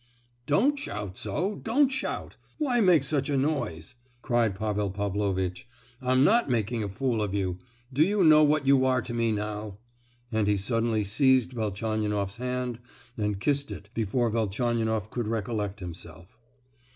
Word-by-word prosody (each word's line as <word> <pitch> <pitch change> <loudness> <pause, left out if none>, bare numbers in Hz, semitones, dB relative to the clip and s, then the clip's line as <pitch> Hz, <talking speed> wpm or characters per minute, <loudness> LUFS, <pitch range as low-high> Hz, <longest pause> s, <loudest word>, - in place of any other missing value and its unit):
"Don't 260 - +3
shout 105 - -5
so—don't 225 - +1
shout! 265 -1 -3 0.2
Why 255 -6 +1
make 180 -7 +5
such 140 0 +1
a 140 - +1
noise?" 135 - -2 0.3
cried 120 -5 +1
Pavel 105 -1 -1
Pavlovitch. 100 -1 -2 0.3
"I'm 130 +1 +3
not 225 +3 +4
making 115 -1 0
a 100 - -3
fool 115 +2 -1
of 100 -1 -2
you! 95 -2 -2 0.3
Do 140 - +1
you 200 +2 +2
know 155 -1 +7
what 150 -1 +2
you 135 -1 +5
are 130 -2 +2
to 120 - -4
me 115 -1 +1
now?" 105 -1 -4 0.5
and 110 -2 +1
he 105 -1 +2
suddenly 115 +1 0
seized 130 +4 +3
Velchaninoff's 105 -2 -2
hand, 125 -1 -3 0.4
and 105 -2 -2
kissed 140 +5 +1
it 105 +1 -9
before 115 +1 0
Velchaninoff 110 -1 -1
could 120 -3 -3
recollect 105 -2 -2
himself. 85 0 -9
115 Hz, 150 wpm, -27 LUFS, 105-135 Hz, 0.5 s, know